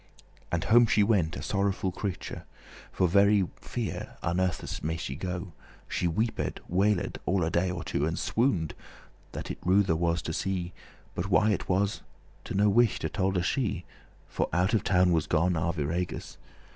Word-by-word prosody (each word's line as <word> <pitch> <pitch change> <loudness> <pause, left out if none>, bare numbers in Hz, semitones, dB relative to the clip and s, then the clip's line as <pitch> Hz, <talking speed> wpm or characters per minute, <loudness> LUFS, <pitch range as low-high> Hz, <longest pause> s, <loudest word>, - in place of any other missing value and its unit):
And 85 -2 0
home 120 +1 +6
she 105 -1 +4
went 95 -6 +1
a - - -6
sorrowful 100 -1 0
creature; 95 0 -5 0.5
For 90 - +2
very 100 +1 +4
fear - - -5
unnethes* 90 +1 -1
may 80 +2 -1
she 65 -6 -4
go. 90 +4 -3
*scarcely 90 +1 -6 0.4
She 90 - 0
weeped, 110 +7 -1
wailed, 95 +1 +1
all 95 -1 +2
a 80 - 0
day 85 +2 +1
or 90 -1 -4
two, 70 +2 -1
And 80 - -2
swooned, 100 - 0 0.6
that - - -5
it - - -7
ruthe 95 +1 +3
was 85 0 +1
to 80 - -3
see: 90 0 -2 0.4
But 90 +3 -3
why 105 +3 +4
it 100 - -2
was, 100 +2 +1 0.4
to - - -5
no 105 +2 +4
wight 115 +2 +3
tolde 95 -2 0
she, 105 - -1 0.4
For - - -2
out 90 +6 +1
of 110 - +2
town 90 -1 +3
was 80 -3 +1
gone 85 +3 +2
Arviragus. 85 +1 -2
90 Hz, 170 wpm, -28 LUFS, 85-100 Hz, 0.6 s, home